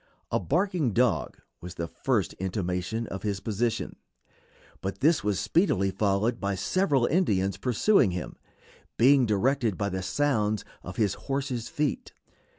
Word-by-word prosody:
A -, -, +2 dB
barking 175 Hz, -, 0 dB
dog 125 Hz, +2 st, +1 dB, 0.2 s
was 90 Hz, +1 st, -8 dB
the 85 Hz, -1 st, -3 dB
first -, -, -1 dB
intimation 95 Hz, +3 st, -2 dB
of 95 Hz, -, -5 dB
his 100 Hz, -2 st, -2 dB
position, 110 Hz, +3 st, -2 dB, 0.8 s
but 95 Hz, +1 st, -4 dB
this 155 Hz, +3 st, +3 dB
was 105 Hz, -2 st, 0 dB
speedily 100 Hz, -, +2 dB
followed 105 Hz, +4 st, 0 dB
by 100 Hz, -1 st, -1 dB
several 140 Hz, -, +1 dB
Indians 100 Hz, -, +1 dB
pursuing 125 Hz, -, +3 dB
him, 90 Hz, 0 st, -5 dB, 0.6 s
being 130 Hz, +1 st, +5 dB
directed 115 Hz, 0 st, +1 dB
by 100 Hz, -1 st, -1 dB
the 95 Hz, 0 st, -3 dB
sounds 110 Hz, -1 st, 0 dB, 0.2 s
of 90 Hz, -, -8 dB
his 105 Hz, -4 st, +1 dB
horse's 135 Hz, -4 st, -3 dB
feet. 150 Hz, -3 st, -2 dB
110 Hz, 140 wpm, -27 LUFS, 95-135 Hz, 0.8 s, being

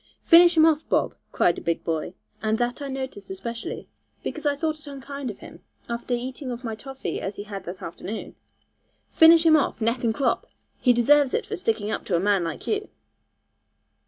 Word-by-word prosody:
'Finish 345 Hz, 0 st, +7 dB
him 315 Hz, -, +7 dB
off, 315 Hz, -1 st, +2 dB
Bob,' -, -, +1 dB, 0.2 s
cried 170 Hz, -, +2 dB
a -, -, -12 dB
big 170 Hz, -1 st, -1 dB
boy, 165 Hz, +2 st, -3 dB, 0.3 s
and 220 Hz, 0 st, +1 dB
that 245 Hz, +3 st, -1 dB
I 280 Hz, -, -4 dB
noticed 260 Hz, -7 st, -6 dB
especially, 225 Hz, +5 st, -6 dB, 0.4 s
because 310 Hz, -1 st, -3 dB
I 285 Hz, -, +2 dB
thought 310 Hz, +1 st, -2 dB
it 300 Hz, -, -16 dB
unkind 280 Hz, -1 st, -6 dB
of 210 Hz, -, -7 dB
him, -, -, -12 dB, 0.3 s
after 235 Hz, +1 st, -2 dB
eating 260 Hz, +3 st, -5 dB
of 245 Hz, +1 st, -5 dB
my 225 Hz, -2 st, -3 dB
toffee 270 Hz, +4 st, -5 dB
as 195 Hz, +1 st, -4 dB
he 205 Hz, -, -6 dB
had 200 Hz, -2 st, -7 dB
that 180 Hz, +2 st, -7 dB
afternoon; 200 Hz, +6 st, -6 dB, 0.8 s
'finish 330 Hz, +1 st, +7 dB
him 320 Hz, -1 st, +7 dB
off, 285 Hz, -7 st, +1 dB
neck 230 Hz, +2 st, 0 dB
and 230 Hz, -, +3 dB
crop; 265 Hz, +5 st, 0 dB, 0.3 s
he 250 Hz, -, +4 dB
deserves 265 Hz, +3 st, +4 dB
it 470 Hz, -, -1 dB
for 415 Hz, +1 st, -4 dB
sticking 220 Hz, -, -1 dB
up -, -, -3 dB
to 185 Hz, -, 0 dB
a -, -, +3 dB
man 195 Hz, -1 st, +2 dB
like 165 Hz, -2 st, -5 dB
you.' 420 Hz, 0 st, -2 dB
245 Hz, 200 wpm, -25 LUFS, 210-295 Hz, 0.8 s, Finish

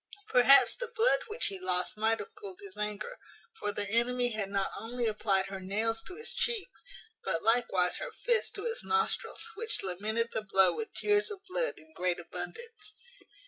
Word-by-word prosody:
Perhaps 270 Hz, -, +7 dB
the -, -, -3 dB
blood 465 Hz, +1 st, +3 dB
which 445 Hz, +2 st, +1 dB
he 195 Hz, -, -1 dB
lost 180 Hz, 0 st, +1 dB
might 220 Hz, +1 st, +2 dB
have 450 Hz, -, -8 dB
cooled 410 Hz, -3 st, -9 dB
his 405 Hz, -1 st, -10 dB
anger: 210 Hz, -, -4 dB, 0.4 s
for 205 Hz, -, -1 dB
the 205 Hz, 0 st, -3 dB
enemy 245 Hz, +3 st, +2 dB
had 215 Hz, -3 st, -2 dB
not 195 Hz, -1 st, -1 dB
only 240 Hz, +2 st, -3 dB
applied 210 Hz, -3 st, +1 dB
her 195 Hz, 0 st, -6 dB
nails 220 Hz, +4 st, -1 dB
to 365 Hz, -, -9 dB
his 455 Hz, +3 st, -5 dB
cheeks, 470 Hz, 0 st, -2 dB, 0.4 s
but 165 Hz, -, -1 dB
likewise 215 Hz, -6 st, +3 dB
her -, -, -5 dB
fist 475 Hz, -1 st, 0 dB
to 400 Hz, -, -5 dB
his 465 Hz, +1 st, -2 dB
nostrils, 445 Hz, +1 st, 0 dB
which 445 Hz, +1 st, -2 dB
lamented 215 Hz, +5 st, -1 dB
the 220 Hz, -, -1 dB
blow 195 Hz, -2 st, +5 dB
with 450 Hz, -1 st, -4 dB
tears 415 Hz, +1 st, +2 dB
of 400 Hz, -2 st, -8 dB
blood -, -, 0 dB
in 315 Hz, 0 st, -16 dB
great 180 Hz, -, 0 dB
abundance. 420 Hz, -, -7 dB
235 Hz, 185 wpm, -31 LUFS, -, 0.4 s, Perhaps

